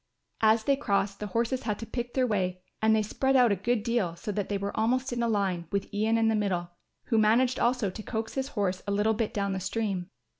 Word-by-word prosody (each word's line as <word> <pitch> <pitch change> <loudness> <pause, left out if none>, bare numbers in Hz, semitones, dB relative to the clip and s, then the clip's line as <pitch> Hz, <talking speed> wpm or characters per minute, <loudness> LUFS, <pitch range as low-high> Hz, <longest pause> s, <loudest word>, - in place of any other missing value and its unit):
As 220 0 +4
they 275 +4 +3
crossed, 200 -6 0
the 210 - -4
horses 235 +5 -1
had 210 -2 -2
to 225 - -6
pick 240 +1 -5
their 260 -1 +3
way 185 -5 -1 0.2
and 220 0 +4
they 215 - +2
spread 265 +6 0
out 245 -4 +6
a - - +3
good 220 +3 0
deal 225 -8 0
so 210 +5 -5
that 205 -1 -3
they 205 - 0
were 200 +1 -4
almost 250 +4 +1
in 240 - -1
a 235 - +1
line, 195 -6 0
with 200 +1 -2
Ian 220 +2 +2
in 225 0 +3
the 225 - +3
middle, 185 -5 -1 0.3
who 225 - +1
managed 240 +4 +3
also 240 -5 +1
to 215 - -7
coax 220 +1 -4
his 265 0 -2
horse 190 -2 0
a - - 0
little 210 +2 +2
bit 220 0 -1
down 200 -1 -1
the 190 - -2
stream. 195 -2 -2
215 Hz, 250 wpm, -28 LUFS, 200-235 Hz, 0.3 s, out